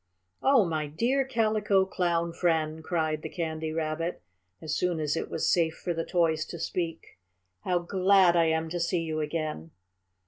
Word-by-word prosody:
"Oh, 265 -6 +5
my 155 -3 -2
dear 240 - +1
Calico 215 -6 +2
Clown 170 -3 -1
friend!" 160 -2 0
cried 155 -2 -1
the 155 - -6
Candy 160 -2 -3
Rabbit, 160 - -3 0.4
as 155 -1 -3
soon 180 -2 0
as 150 -1 0
it - - -3
was 160 - -1
safe 165 -2 +2
for 175 - -3
the 165 0 -2
toys 165 -3 +1
to 170 - -8
speak, 165 - -4 0.5
"how 180 -1 +2
glad 185 0 +4
I 170 -1 +4
am 160 0 +1
to 175 +2 -3
see 170 +1 0
you 155 -1 -3
again." 150 - -3
165 Hz, 170 wpm, -28 LUFS, 160-180 Hz, 0.5 s, Oh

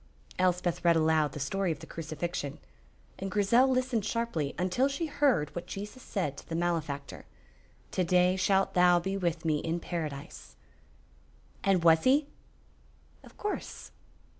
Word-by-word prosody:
Elspeth 180 -1 +1
read 170 -1 +5
aloud 155 -2 +2
the - - -6
story 180 +7 -1
of 155 - -3
the - - -11
Crucifixion, 160 -2 -4 0.6
and 195 - -3
Grizel 210 +6 +4
listened 255 -4 +1
sharply 215 -10 -2
until 185 +9 +1
she 280 +4 -2
heard 285 - +1
what 175 - -6
Jesus 210 +6 -7
said 170 - -3
to - - -12
the 165 - -3
malefactor: 160 -5 -3 0.6
"To 185 - 0
day 180 +1 +3
shalt 190 +1 +2
thou 180 -1 +5
be 190 +3 -3
with 170 -4 -2
me 155 -2 +2
in 165 +2 -2
Paradise." 155 -5 -6 1.1
"And 190 -3 +2
was 160 -1 +5
he?" 280 +3 +4 1.0
"Of - - -16
course." 415 - -5
180 Hz, 145 wpm, -30 LUFS, 160-200 Hz, 1.1 s, read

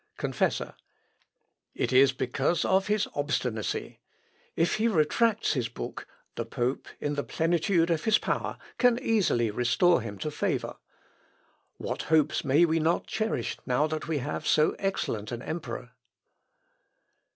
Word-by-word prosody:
Confessor. - - -1 1.0
"It - - -1
is 135 +1 +6
because 135 +5 0
of 190 +1 +2
his 210 0 +1
obstinacy. 125 -7 -2 0.6
If 165 +1 +1
he 220 +2 +2
retracts 220 +4 +2
his 125 -5 -1
book, 115 - -7 0.3
the 115 - -3
pope, 120 +3 -2
in 145 - -2
the 145 -1 -2
plenitude 170 +1 +1
of 165 -1 0
his 220 -1 +5
power, - - -2 0.2
can 245 -2 +4
easily 190 - +1
restore 130 - +3
him 105 -2 -6
to 150 - -4
favour. - - -2 1.0
What - - -4
hopes 155 -2 +3
may 145 +5 +4
we 165 0 +1
not 160 +2 +1
cherish 220 +1 -2
now 125 +3 +2
that 155 0 -4
we 160 -2 0
have 145 +2 -4
so 155 - +3
excellent 115 - -2
an 120 +1 -5
emperor!..." 125 -6 -5
155 Hz, 140 wpm, -28 LUFS, 125-175 Hz, 1.0 s, is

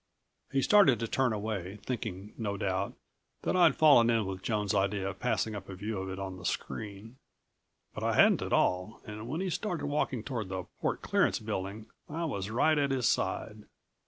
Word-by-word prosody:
He 135 -1 +1
started 175 - +6
to 115 - -2
turn 130 +1 +1
away, 100 -3 -3
thinking, 105 -5 -4
no 100 -3 -3
doubt, 95 0 -1 0.5
that - - 0
I'd 170 -5 +5
fallen 140 -7 +6
in 115 -3 +2
with 95 -1 -5
Joan's 105 -2 0
idea 100 -1 +1
of 100 -1 -5
passing 115 -3 0
up 100 -2 -7
a 95 - -6
view 105 +2 -4
of 95 0 -4
it 95 - -5
on 95 -1 -5
the - - -11
screen. 105 +6 -4 0.8
But - - -6
I - - +1
hadn't - - +5
at - - -4
all 90 +4 +1
and 110 +1 -7
when 155 +6 -2
he 190 -1 -1
started 180 -2 -2
walking 145 -5 -1
toward 115 -7 -4
the 95 -1 -3 0.2
port - - -1
clearance - - +2
building 105 0 -4 0.2
I 165 +3 -2
was 100 -10 -3
right 150 +7 +3
at 140 -1 +2
his 130 -3 0
side. - - -1
110 Hz, 195 wpm, -30 LUFS, 95-130 Hz, 0.8 s, started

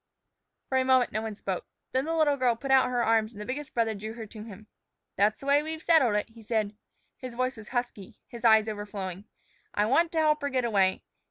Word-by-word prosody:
For 260 - +1
a - - +2
moment 260 -1 +3
no 215 - -2
one 220 -1 -5
spoke. 190 -3 -4 0.2
Then 260 +2 0
the 325 +1 -1
little 305 -3 +3
girl 250 -3 +2
put 270 +4 -4
out 265 -1 +5
her 245 -1 0
arms, 225 0 +2
and 205 - -11
the 210 - -6
biggest 285 +4 -5
brother 225 -2 +1
drew 215 +2 -6
her 225 -1 -7
to 215 0 -11
him. 215 -1 -11 0.5
"That's 210 +2 +2
the - - -9
way 285 +1 +4
we've 315 +1 -6
settled 270 -10 +4
it," 210 - -1
he 225 0 -15
said. 215 -2 -1 0.4
His 255 -2 -8
voice 255 +2 -1
was 215 -2 -11
husky, 240 -6 -4
his 235 0 -10
eyes 220 -1 +6
overflowing. 205 -3 -5 0.5
"I 205 - +2
want 325 +9 +3
to 325 - +1
help 305 -1 +3
her 285 - -1
get 255 -3 0
away. 195 -4 +2
235 Hz, 235 wpm, -28 LUFS, 215-265 Hz, 0.5 s, eyes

